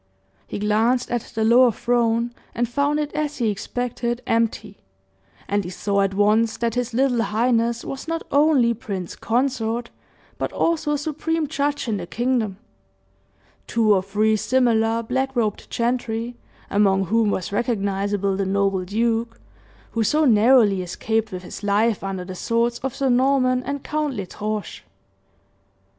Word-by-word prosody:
He - - -5
glanced 220 +4 +1
at 240 -1 0
the 220 - +1
lower 240 +2 +6
throne 235 +1 0 0.2
and 240 0 0
found 285 +4 0
it 295 -1 -3
as 300 -1 -2
he 230 -4 +1
expected, 240 +3 -3
empty; 220 -3 -1 0.7
and 205 0 0
he 175 - -6
saw 200 +2 0
at 195 0 0
once 215 +2 +3
that 230 -1 -1
his 245 0 -2
little 255 -2 +2
highness 230 +2 +1
was 270 +3 -6
not 330 0 -2
only 285 -5 +4
prince 200 -6 -6
consort, 240 -1 -1 0.5
but - - -2
also 310 -3 +1
supreme 310 +2 -2
judge 290 -1 -2
in 215 -3 0
the 175 -2 -6
kingdom. 235 -4 -1 1.1
Two 220 -3 +3
or 190 - +3
three 210 +3 +1
similar 230 -1 +2
black 265 +3 -2
robed 215 -4 -1
gentry, 235 0 -2 0.4
among 195 -1 +3
whom 220 +3 +2
was 190 -2 -2
recognizable 200 -3 0
the 195 - -1
noble 195 -1 +1
duke 230 +3 -1 0.5
who 230 - 0
so 305 +8 +2
narrowly 220 -4 +5
escaped 220 +5 -2
with 185 0 -6
his - - -8
life 210 +1 +1
under 190 -2 -4
the 185 - -7
swords 230 +5 0
of 265 -1 -4
Sir 270 -1 0
Norman 255 0 +3
and 280 +1 -4
Count 300 -3 -2
L'Estrange. 210 +1 -5
230 Hz, 150 wpm, -22 LUFS, 205-255 Hz, 1.1 s, lower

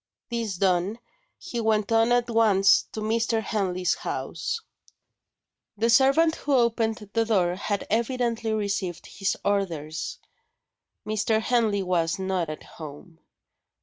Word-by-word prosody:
This 230 -4 -2
done, 185 +3 +1 0.4
he 240 - -5
went 215 -1 +1
on 225 +1 +4
at 245 0 +3
once 215 -4 +4
to 220 - -5
Mr. 225 +1 0
Henley's 185 -5 0
house. - - -4 1.2
The 230 +3 +2
servant 275 +6 +4
who 285 -1 0
opened 225 -3 +1
the 230 - +3
door 190 -6 +2
had 200 +2 -3
evidently 230 0 0
received 200 -5 -2
his 195 0 -2
orders. 165 -6 -2 0.9
Mr. 215 +1 +1
Henley 220 -4 +1
was 170 -3 0
"not 190 -3 -1
at 155 - -7
home." 160 +2 -11
215 Hz, 120 wpm, -26 LUFS, 185-230 Hz, 1.2 s, on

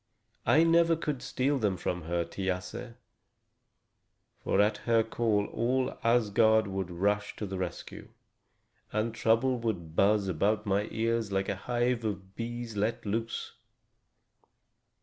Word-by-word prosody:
I 160 - +6
never 165 0 +4
could 150 -5 -3
steal 135 +2 0
them 100 -5 0
from 90 -1 -3
her, 85 0 -1
Thiasse; 95 +6 -4 1.5
for - - +1
at 105 +1 +3
her 115 0 +2
call 110 -2 0
all 125 +3 0
Asgard 110 -1 +4
would 95 -2 -3
rush 100 +4 0
to 105 - -4
the 95 -1 -5
rescue, 90 -3 -6 0.8
and 110 +2 -1
trouble 115 +3 +2
would 90 -9 -3
buzz 100 +1 +3
about 100 +5 +1
my 100 +1 +1
ears 115 -1 -1
like 95 0 0
a - - 0
hive 120 +3 -1
of 95 -3 -4
bees 120 -1 -5
let 115 +4 -1
loose." 115 +3 -3
110 Hz, 130 wpm, -30 LUFS, 100-120 Hz, 1.5 s, I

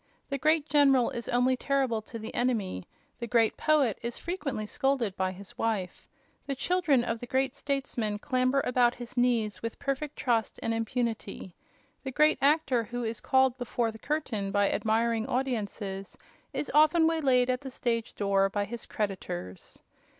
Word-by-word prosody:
The 275 -1 -2
great 310 +2 +2
general 275 -4 +4
is 235 - -5
only 250 +1 +3
terrible 260 -4 0
to 230 - -6
the 220 0 -7
enemy; 215 - -1 0.3
the 235 - -4
great 230 -2 +3
poet 290 -9 +2
is 235 0 -4
frequently 295 - -3
scolded 255 -4 0
by 185 0 0
his 190 +1 -11
wife; 205 -6 -2 0.4
the 275 - -2
children 310 -4 +2
of 230 -1 -2
the 245 - -7
great 265 +2 0
statesman 270 -7 -2
clamber 255 +3 +1
about 245 -1 +3
his 240 0 -9
knees 240 -4 +1
with 230 0 -4
perfect 275 +1 -3
trust 230 -3 0
and 230 - 0
impunity; 225 -5 -3 0.5
the 265 - -3
great 300 +4 +3
actor 275 -5 +3
who 245 +2 -4
is 225 -1 -3
called 260 -1 +3
before 240 -2 -1
the 220 - -12
curtain 230 -10 -2
by 200 0 +2
admiring 225 +1 +1
audiences 210 -7 -3 0.3
is - - -3
often 310 +2 +5
waylaid 275 -7 +3
at 250 - -2
the 270 - -6
stage 235 -3 -2
door 195 -1 +2
by 205 +1 -1
his 235 +2 -6
creditors. 95 - -5
245 Hz, 165 wpm, -29 LUFS, 220-270 Hz, 0.5 s, often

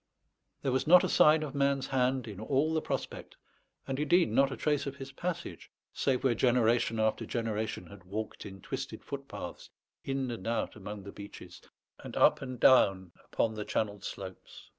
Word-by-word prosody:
There 135 - +1
was 130 +2 0
not 180 +2 +8
a - - +2
sign 155 +1 +5
of 145 -2 -5
man's 140 -1 +1
hand 130 -1 0
in 100 -3 -7
all 140 +7 +1
the 160 - +1
prospect; - - -5 0.5
and 135 0 -3
indeed 165 +4 +3
not 135 0 +3
a - - -5
trace 145 -2 0
of 140 - -4
his 135 -1 -8
passage, 170 - -5 0.2
save 130 -2 0
where 130 -3 +3
generation 115 -1 +2
after 110 0 +1
generation 110 -4 -3
had 95 +1 -14
walked 105 +4 -5
in 95 -1 -10
twisted - - -5
footpaths, - - -7 0.3
in 135 -2 -2
and 115 -3 -6
out 115 0 -1
among 105 -1 -7
the 100 - -8
beeches, 100 0 -11 0.4
and - - -8
up - - +5
and 130 -3 -6
down 95 -9 +5 0.2
upon 110 - 0
the 105 -1 -4
channeled 105 -2 -2
slopes. 95 -2 -9
125 Hz, 180 wpm, -31 LUFS, 105-140 Hz, 0.5 s, not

